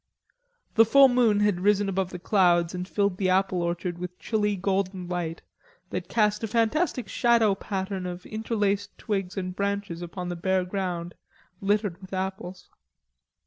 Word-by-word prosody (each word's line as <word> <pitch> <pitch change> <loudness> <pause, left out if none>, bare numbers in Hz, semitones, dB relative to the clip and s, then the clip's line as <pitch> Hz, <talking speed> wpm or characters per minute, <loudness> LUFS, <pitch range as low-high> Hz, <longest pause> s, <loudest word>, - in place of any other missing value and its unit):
The 225 - +7
full 270 +4 +7
moon 235 -5 +3
had 205 -4 +2
risen 205 +1 +3
above 190 -1 -1
the 180 - -6
clouds 175 -2 +3
and 180 0 -4
filled 200 -2 0
the 190 -1 +1
apple 185 -1 +2
orchard 175 0 -2
with 180 0 -6
chilly 210 -1 0
golden 190 -1 -1
light 175 -2 -3 0.5
that - - -4
cast 210 -1 +1
a - - 0
fantastic 235 - +1
shadow 230 -4 +3
pattern 190 -1 -4
of 180 +1 -7
interlaced 205 -2 -1
twigs 195 -4 -3
and 185 -1 -3
branches 200 -3 -2
upon 175 +1 -5
the 175 - -3
bare 185 +1 0
ground 180 -2 -3 0.5
littered 200 -2 0
with 190 0 -11
apples. 185 -1 -4
195 Hz, 155 wpm, -26 LUFS, 180-210 Hz, 0.5 s, The